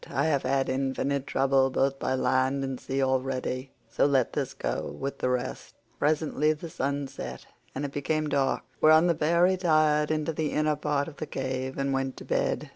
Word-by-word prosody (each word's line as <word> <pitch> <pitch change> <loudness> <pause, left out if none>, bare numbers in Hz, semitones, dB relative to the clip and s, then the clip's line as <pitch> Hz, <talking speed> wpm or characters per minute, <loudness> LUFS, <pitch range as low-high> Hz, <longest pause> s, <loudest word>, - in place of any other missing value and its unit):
I - - 0
have 145 -4 +2
had 135 +1 +1
infinite 135 +1 -1
trouble 135 0 +3
both 135 +1 0
by 130 - 0
land 130 +1 +1
and 135 -2 -3
sea 135 +1 -1
already, 130 0 -1 0.2
so - - +2
let 135 -4 +2
this - - -2
go - - -3
with 140 0 -4
the 125 - 0
rest." 125 -1 -3 0.2
Presently 155 0 +2
the 160 +2 -9
sun 140 0 -2
set - - -8 0.3
and 145 - -2
it 140 - -5
became 155 +2 -1
dark, 140 -2 +1 0.2
whereon 155 +2 +7
the 175 - +4
pair 170 +2 +2
retired 155 -5 +3
into 155 +1 -1
the 155 -1 -2
inner 150 0 +2
part 145 -1 -1
of 155 - -10
the 155 - -5
cave 130 0 -3
and 135 0 0
went 135 0 -2
to - - -9
bed. - - -1
140 Hz, 195 wpm, -27 LUFS, 135-155 Hz, 0.3 s, whereon